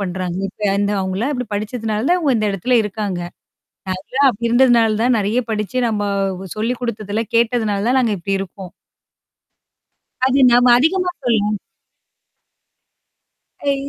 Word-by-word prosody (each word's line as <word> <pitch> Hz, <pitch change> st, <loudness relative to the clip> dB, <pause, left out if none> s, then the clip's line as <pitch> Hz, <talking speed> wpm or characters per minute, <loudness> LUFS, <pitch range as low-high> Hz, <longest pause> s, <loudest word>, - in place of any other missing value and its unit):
பண்றாங்க? 185 Hz, -1 st, -3 dB
இப்ப 205 Hz, +1 st, -2 dB
இந்த 205 Hz, 0 st, 0 dB
அவுங்களாம் 190 Hz, +9 st, -2 dB
இப்பிடி 250 Hz, -2 st, -4 dB
படிச்சதுனால 215 Hz, +1 st, -3 dB
தான் 360 Hz, 0 st, +3 dB
இங்க 280 Hz, -7 st, +2 dB
இந்த 215 Hz, -1 st, 0 dB
இடத்துல 245 Hz, +7 st, +1 dB
இருக்காங்க. 205 Hz, -3 st, -3 dB, 0.9 s
நான்லாம் 275 Hz, +1 st, +4 dB
அப்பிடி 235 Hz, 0 st, -3 dB
இருந்ததுனால 235 Hz, -3 st, +4 dB
தான், 245 Hz, 0 st, +3 dB
நெறைய 210 Hz, +4 st, +1 dB
படிச்சு 215 Hz, +3 st, -2 dB
நம்ம 210 Hz, -2 st, -1 dB, 0.5 s
சொல்லி 230 Hz, +4 st, -1 dB
குடுத்ததெல்லாம் 215 Hz, -2 st, -3 dB
கேட்டதுனால 225 Hz, -3 st, +1 dB
தான் 260 Hz, +1 st, +3 dB
நாங்க 230 Hz, -4 st, +1 dB
இப்பிடி 195 Hz, +3 st, -2 dB
இருக்கோம். 190 Hz, -1 st, -8 dB, 1.5 s
அது 265 Hz, +1 st, +2 dB
நம்ம 245 Hz, +1 st, +5 dB
அதிகமா 360 Hz, +6 st, +1 dB
சொல்லும். 210 Hz, -3 st, +1 dB, 2.1 s
அ -, -, -11 dB
இ -, -, +1 dB
220 Hz, 135 wpm, -19 LUFS, 205-245 Hz, 2.1 s, நம்ம